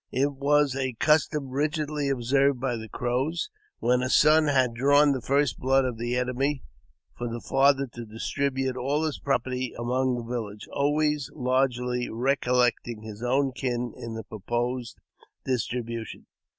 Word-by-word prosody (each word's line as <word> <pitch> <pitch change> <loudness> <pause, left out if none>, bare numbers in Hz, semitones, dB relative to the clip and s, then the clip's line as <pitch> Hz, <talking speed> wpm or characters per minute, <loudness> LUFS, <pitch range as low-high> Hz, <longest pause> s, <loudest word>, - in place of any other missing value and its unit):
It 140 +3 +1
was 140 0 +2
a 130 -2 -1
custom 150 +2 +2
rigidly 150 +1 -1
observed 135 +1 +2
by 130 -1 -1
the 110 -1 -7
Crows, 130 - -2 0.3
when 125 +1 +2
a 130 - -1
son 155 +3 +5
had 130 -4 +2
drawn 145 +4 +4
the 130 -2 -1
first 140 +1 +1
blood 135 +1 +3
of 120 -3 -3
the 120 +1 -1
enemy, 130 +3 -1 0.5
for 120 - -4
the 120 0 -4
father 140 +2 +3
to 120 -1 -7
dis 110 +1 -6
tribute 135 -2 0
all 140 +5 0
his 155 -2 -2
property 130 -2 -1
among 125 +2 0
the 120 - -4
village, 110 -3 -5
always 150 0 +1
largely 125 -2 0
recol 125 +1 0
lecting 120 -2 -1
his 110 0 -9
own 135 +3 +1
kin 125 -1 -3
in 115 -1 -7
the 110 - -5
proposed 120 +4 -3 0.5
distribution. 115 -2 -3
130 Hz, 155 wpm, -26 LUFS, 120-140 Hz, 0.5 s, son